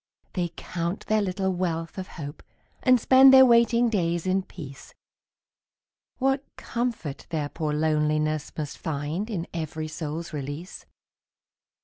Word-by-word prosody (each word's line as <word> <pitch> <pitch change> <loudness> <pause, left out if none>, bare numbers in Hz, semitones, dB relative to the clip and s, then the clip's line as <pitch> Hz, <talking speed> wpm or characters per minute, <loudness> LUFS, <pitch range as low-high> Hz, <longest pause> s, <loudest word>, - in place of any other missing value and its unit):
They 175 -2 -1
count 170 +2 -4
their 215 0 +2
little 190 -1 -1
wealth 170 -1 -2
of 185 - -5
hope 145 -1 -7 0.4
And 255 -2 +5
spend 265 +3 +7
their 265 0 +9
waiting 235 0 +4
days 175 -6 0
in 185 +1 +2
peace, 145 -7 -11 1.2
What 270 +1 +1
comfort 230 - -3
their 150 -3 -2
poor 155 -1 -3
loneliness 155 0 0
Must 150 -2 -5
find 160 +7 -3
in 180 -6 -3
every 155 -1 -4
soul's 155 +2 -5
release! 145 +5 -6
170 Hz, 125 wpm, -26 LUFS, 155-210 Hz, 1.2 s, their